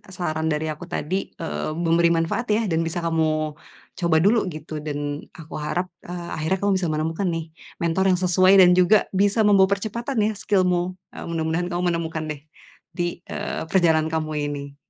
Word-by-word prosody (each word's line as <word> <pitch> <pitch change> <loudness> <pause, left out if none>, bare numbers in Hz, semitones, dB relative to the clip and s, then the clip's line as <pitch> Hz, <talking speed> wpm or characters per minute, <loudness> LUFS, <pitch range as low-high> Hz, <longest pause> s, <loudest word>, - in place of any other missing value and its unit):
saran 160 -2 -2
dari 150 +1 -2
aku 155 +4 -8
tadi, 175 +2 -3 0.3
eee, 75 - -3
memberi 170 0 +3
manfaat 165 +9 -1
ya 225 - +1
dan 160 - +2
bisa 175 +2 -3
kamu 165 -1 +2 0.7
coba 170 -2 +2
dulu 225 +4 +5
gitu 155 0 -10
dan 145 -1 -3 0.4
aku 165 -2 -11
harap, 155 +5 -2 0.2
eee, 175 -1 -6
akhirnya 160 +5 0
kamu 200 - +3
bisa 180 - -1
menemukan 160 +5 -1
nih, 165 - -3 0.4
mentor 170 +3 +1
yang 180 - -4
sesuai 185 +1 +5
dan 180 - +7
juga 195 +4 +6
bisa 200 +3 +2
membawa 195 -2 +6
percepatan 235 +6 -4
ya 215 - +2
skill-mu, 185 -3 0 0.2
eee, - - -7
mudah-mudahan 165 +1 -1
kamu 175 +1 -1
menemukan 165 -1 -3
deh 150 - -6 0.6
di, 175 -1 -2
eee, - - -4
perjalanan 160 -4 +3
kamu 155 -1 -2 0.2
ini. 140 -1 -6
170 Hz, 175 wpm, -23 LUFS, 160-185 Hz, 0.7 s, dan